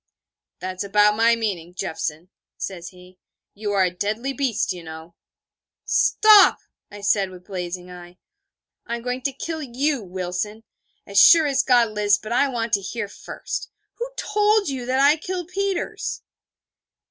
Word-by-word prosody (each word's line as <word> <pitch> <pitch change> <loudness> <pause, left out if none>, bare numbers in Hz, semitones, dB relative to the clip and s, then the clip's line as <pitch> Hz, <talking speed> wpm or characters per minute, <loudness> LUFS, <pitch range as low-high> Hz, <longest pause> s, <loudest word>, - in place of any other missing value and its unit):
'That's 185 0 -4
about 210 +1 +3
my 230 +1 +4
meaning, 180 -7 -4
Jeffson,' 165 -1 -4 0.3
says 175 -3 -6
he: 180 0 -18 0.3
'you 205 0 -4
are 195 -2 +3
a 180 - +1
deadly 215 +9 -3
beast, 250 -8 -1
you 180 - -9
know.' 160 +1 -10 0.7
'Stop!' 430 -2 +6 0.3
I 205 0 -11
said, 200 -1 +1
with 180 -1 -13
blazing 180 -1 -6
eye. 175 0 -12 0.7
'I 235 - -2
am 235 - -7
going 250 +1 -3
to 275 - -1
kill 315 +4 -5
you, 275 +1 -1
Wilson 185 +3 -5 0.4
as 200 0 +2
sure 330 -2 +8
as 275 -2 +2
God 240 -4 +3
lives: 205 -1 +2
but 215 - -9
I 250 +4 +3
want 235 -4 -3
to 200 - +3
hear 210 +2 -4
first. 200 - -7 0.3
Who 485 +1 -3
told 425 -3 +2
you 255 -3 -5
that 260 +1 +1
I 290 +3 +5
killed 355 +1 -5
Peters?' 395 0 -3
215 Hz, 160 wpm, -22 LUFS, 185-270 Hz, 0.7 s, sure